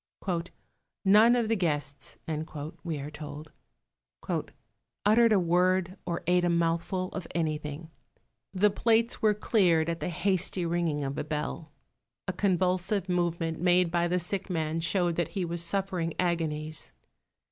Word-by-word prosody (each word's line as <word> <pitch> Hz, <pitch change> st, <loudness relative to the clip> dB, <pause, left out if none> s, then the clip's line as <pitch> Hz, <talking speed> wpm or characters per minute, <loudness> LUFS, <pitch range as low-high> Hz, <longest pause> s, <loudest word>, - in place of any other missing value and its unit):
"None 215 Hz, +5 st, +7 dB
of 235 Hz, -2 st, +1 dB
the 225 Hz, -, +2 dB
guests," 145 Hz, -7 st, -2 dB, 0.7 s
we 165 Hz, -4 st, -3 dB
are 145 Hz, +2 st, -6 dB
told, 150 Hz, 0 st, -8 dB, 1.5 s
"uttered 225 Hz, +2 st, +5 dB
a 210 Hz, -, +5 dB
word 180 Hz, +1 st, +2 dB
or 170 Hz, -1 st, -2 dB
ate 180 Hz, 0 st, +3 dB
a 175 Hz, -, +2 dB
mouthful 170 Hz, +2 st, 0 dB
of 185 Hz, -, -6 dB
anything; 155 Hz, -1 st, -3 dB, 0.6 s
the 200 Hz, +2 st, +3 dB
plates 230 Hz, +2 st, +2 dB
were 215 Hz, -1 st, +4 dB
cleared 175 Hz, -7 st, +2 dB
at 165 Hz, 0 st, -2 dB
the 150 Hz, -, -2 dB
hasty 185 Hz, 0 st, 0 dB
ringing 165 Hz, -3 st, 0 dB
of 135 Hz, +1 st, -3 dB
a -, -, -1 dB
bell. 150 Hz, +1 st, -4 dB, 0.6 s
A 185 Hz, -, -1 dB
convulsive 185 Hz, +1 st, +1 dB
movement 170 Hz, -2 st, 0 dB
made 180 Hz, 0 st, +3 dB
by 175 Hz, 0 st, +2 dB
the 180 Hz, +1 st, +1 dB
sick 185 Hz, +3 st, -3 dB
man 160 Hz, -2 st, -1 dB
showed 175 Hz, 0 st, +1 dB
that 170 Hz, -3 st, -1 dB
he 185 Hz, -, 0 dB
was 170 Hz, 0 st, -3 dB
suffering 180 Hz, -2 st, -1 dB
agonies. 155 Hz, -3 st, -1 dB
175 Hz, 140 wpm, -29 LUFS, 160-190 Hz, 1.5 s, None